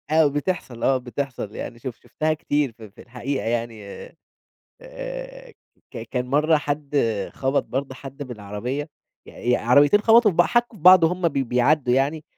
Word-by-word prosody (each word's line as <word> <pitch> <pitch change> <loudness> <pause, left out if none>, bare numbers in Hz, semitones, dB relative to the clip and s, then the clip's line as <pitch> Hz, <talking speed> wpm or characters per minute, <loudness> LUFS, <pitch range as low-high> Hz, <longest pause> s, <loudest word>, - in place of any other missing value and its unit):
آه 155 0 +4
بتحصَل، 145 -4 -3
آه 135 - +3
بتحصَل 125 -3 -5
يعني 120 - -7
شف 125 -1 -6
شُفتها 155 0 -1
كتير 145 -3 -1
ف 115 - -23
في 105 -1 -13
الحقيقة، 130 +3 -4
يعني 115 -2 -3 1.0
آآ - - -8 0.4
ك - - -7
كان 125 -1 -2
مرَّة 150 +4 +3
حد 145 0 -3 0.4
خبَط 135 +1 0
برضه 135 0 -4
حد 135 +2 -9
بالعربية، 125 +4 -5 0.4
ي 120 - -4
ي - - +4
عربيتين 145 - +4
خبَطوا 225 0 +5
في 170 - -8
بع 175 - +5
حكّوا 240 +3 0
في - - -19
بعض 185 -1 +8
وهُم 175 +1 +1
بي 140 -3 -1
بيعَدّوا 125 +1 +2
يعني 145 +4 0
140 Hz, 165 wpm, -23 LUFS, 125-165 Hz, 1.0 s, بعض